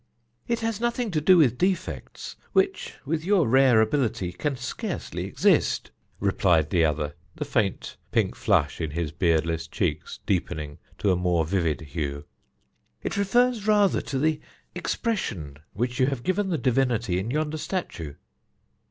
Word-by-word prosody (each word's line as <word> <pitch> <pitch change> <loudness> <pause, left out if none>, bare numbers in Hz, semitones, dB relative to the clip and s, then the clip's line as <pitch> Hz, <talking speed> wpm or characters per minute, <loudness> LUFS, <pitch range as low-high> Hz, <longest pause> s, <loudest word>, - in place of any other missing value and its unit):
"It 235 -1 0
has 225 -1 -2
nothing 240 -2 0
to 155 -3 0
do 185 +4 +6
with 130 -7 +4
defects, 185 0 -2 0.2
which, 385 0 +1
with 155 +2 -1
your 185 - +3
rare 130 -2 +5
ability, 110 -5 0
can 140 +9 -2
scarcely 120 0 -4
exist," - - +2 0.3
replied 90 -5 +2
the 85 -2 +3
other, 75 -1 0 0.2
the 150 - -4
faint 110 -9 -1
pink - - +1
flush - - +1
in 80 - -1
his 80 0 -3
beardless 80 0 0
cheeks - - -2
deepening 75 -2 -2 0.2
to 100 - +2
a - - +3
more 90 -2 +1
vivid 85 -4 0
hue. 70 -2 -4 0.8
"It - - -2
refers 220 +2 +2
rather 205 -2 +4
to 135 - -4
the 155 +2 +1 0.3
expression 100 - -3 0.2
which 120 +3 -2
you 130 - +4
have 135 -4 -2
given 190 +1 0
the 170 - 0
divinity 120 -8 +1
in 100 +5 -3
yonder 155 +3 -1
statue." 85 - -4
120 Hz, 150 wpm, -26 LUFS, -, 0.8 s, do